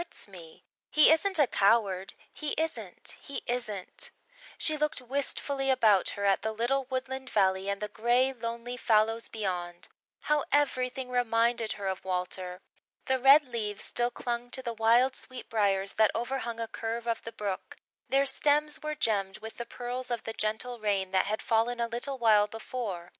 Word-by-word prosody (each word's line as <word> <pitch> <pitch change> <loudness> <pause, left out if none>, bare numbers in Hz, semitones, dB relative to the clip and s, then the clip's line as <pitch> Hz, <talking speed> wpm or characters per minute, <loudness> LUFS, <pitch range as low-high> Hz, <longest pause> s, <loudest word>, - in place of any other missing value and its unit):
"It - - -5
hurts - - -6
me. 170 -5 -13 0.3
He 300 0 +7
isn't 375 +4 +3
a 295 - +6
coward 195 -4 +2 0.2
he 300 -2 -3
isn't 320 0 -3
he 280 - -6
isn't!" 215 -6 -3 0.5
She 310 - +2
looked 300 0 -1
wistfully 270 +1 -1
about 220 -7 +4
her 200 - -1
at 195 -1 +3
the 220 - -1
little 245 +5 0
woodland 260 0 -4
valley 190 -1 +2
and 200 0 -1
the 210 - -3
grey, 240 +5 +2
lonely 235 0 -5
fallows 225 -1 +2
beyond. 180 -5 -4 0.3
How 300 -1 +1
everything 255 -3 +1
reminded 235 -2 +1
her 200 - -7
of 190 -1 -2
Walter! 180 0 -3 0.4
The 265 0 +1
red 275 +3 +7
leaves 215 -4 -3
still 240 0 0
clung 240 0 -4
to 260 - -2
the 235 -2 -3
wild 235 +4 +4
sweet 255 -1 -8
briars 200 -3 +1
that 220 -1 +4
overhung 235 -1 -3
a 230 - -2
curve 230 +1 -4
of 230 -1 -1
the 230 - -7
brook; 205 -4 -5 0.3
their 275 +1 +3
stems 300 +2 +1
were 305 0 -3
gemmed 200 -7 0
with 220 +1 -9
the 235 - -5
pearls 250 +1 -5
of 240 -2 -2
the 225 - -5
gentle 220 +3 -2
rain 200 -3 0
that 190 0 +2
had 215 +1 -2
fallen 235 +1 +1
a 235 - +1
little 245 +4 -3
while 215 -4 +5
before. 210 -5 -5
235 Hz, 175 wpm, -29 LUFS, 210-260 Hz, 0.5 s, He